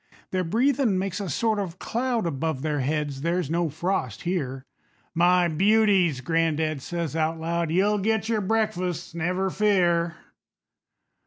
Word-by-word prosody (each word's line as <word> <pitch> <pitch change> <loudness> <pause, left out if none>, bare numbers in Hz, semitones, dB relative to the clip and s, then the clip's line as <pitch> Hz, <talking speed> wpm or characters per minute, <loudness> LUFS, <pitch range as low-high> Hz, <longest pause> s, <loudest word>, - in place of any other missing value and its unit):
Their 185 -1 0
breathin' 235 - +2
makes 190 +1 -2
a 200 -3 -4
sort 220 - 0
of 185 -3 -4
cloud 240 -1 -1
Above 160 -2 -2
their 150 -2 -1
heads 145 0 -2
there's 170 -1 -1
no 170 -1 +1
frost 155 - -2
here. 140 -7 -3 0.5
"My 175 +1 +4
beauties," 190 -4 +3
gran'dad 160 0 0
says 170 -1 -4
out 160 0 0
loud, 170 0 -1
"You'll 200 +5 +2
get 220 +2 0
your 225 -2 0
breakfasts, 185 -6 -1
never 180 +3 -1
fear." 175 -5 +2
175 Hz, 140 wpm, -25 LUFS, 160-200 Hz, 0.5 s, My